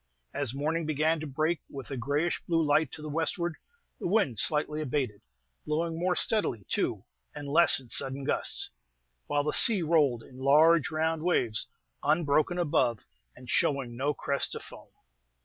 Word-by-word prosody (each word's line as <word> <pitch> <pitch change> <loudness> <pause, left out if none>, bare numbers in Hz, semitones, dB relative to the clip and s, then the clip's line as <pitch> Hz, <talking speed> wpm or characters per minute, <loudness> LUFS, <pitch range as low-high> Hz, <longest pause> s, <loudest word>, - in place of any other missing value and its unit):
As 140 -3 0
morning 155 +3 -2
began 155 +2 0
to 155 - -6
break 155 +4 -1
with 135 -3 -9
a - - -3
grayish 145 +7 -2
blue 165 -1 +1
light 150 -1 +1
to 155 - -7
the - - -6
westward, 165 +2 -2 0.4
the - - -3
wind 170 - +1
slightly 150 0 +2
abated, 130 -7 -3 0.4
blowing 165 +2 -2
more 180 +1 0
steadily, 125 - +1
too, - - -1 0.3
and 145 -1 -7
less 150 0 +5
in 130 - -15
sudden 135 +3 +2
gusts; - - -1 0.6
while 145 0 0
the 150 - -2
sea 210 -7 +6
rolled 145 -8 +1
in 125 - -16
large 155 +4 +4
round 160 0 -1
waves, 125 -11 0 0.3
unbroken 155 +2 +1
above, 130 -9 0 0.3
and 125 - -14
showing 130 -1 0
no 140 +4 -1
crest 140 -1 +1
of - - -7
foam. - - -13
150 Hz, 165 wpm, -28 LUFS, 135-165 Hz, 0.6 s, sea